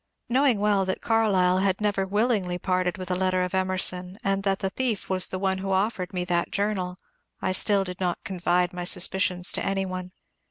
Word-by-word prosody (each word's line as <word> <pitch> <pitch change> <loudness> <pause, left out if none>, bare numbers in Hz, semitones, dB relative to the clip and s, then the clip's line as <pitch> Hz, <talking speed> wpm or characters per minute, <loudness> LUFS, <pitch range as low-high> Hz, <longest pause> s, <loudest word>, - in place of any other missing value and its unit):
Knowing 260 -1 +3
well 205 -1 +2
that 190 0 -2
Carlyle 195 -5 +2
had 190 -1 +1
never 205 -2 0
willingly 205 -3 +1
parted 185 0 0
wiUi 185 -2 -6
a 180 - 0
letter 185 -1 +1
of 180 - -4
Emerson, 185 0 0
and 195 -1 +1
that 195 -1 +1
the 195 -1 -2
thief 235 -6 -2
was 185 -1 +2
the 185 - -4
one 190 0 0
who 195 0 -3
offered 190 -1 0
me 180 -1 -2
that 175 -1 0
journal, 195 -3 -2 0.4
I 185 - -1
still 200 +1 +3
did 180 -1 -7
not 180 -2 -2
confide 180 -2 0
my 180 0 -4
suspicions 180 0 +1
to - - -3
any 195 0 0
one. 185 -1 -5
190 Hz, 200 wpm, -26 LUFS, 180-200 Hz, 0.4 s, Knowing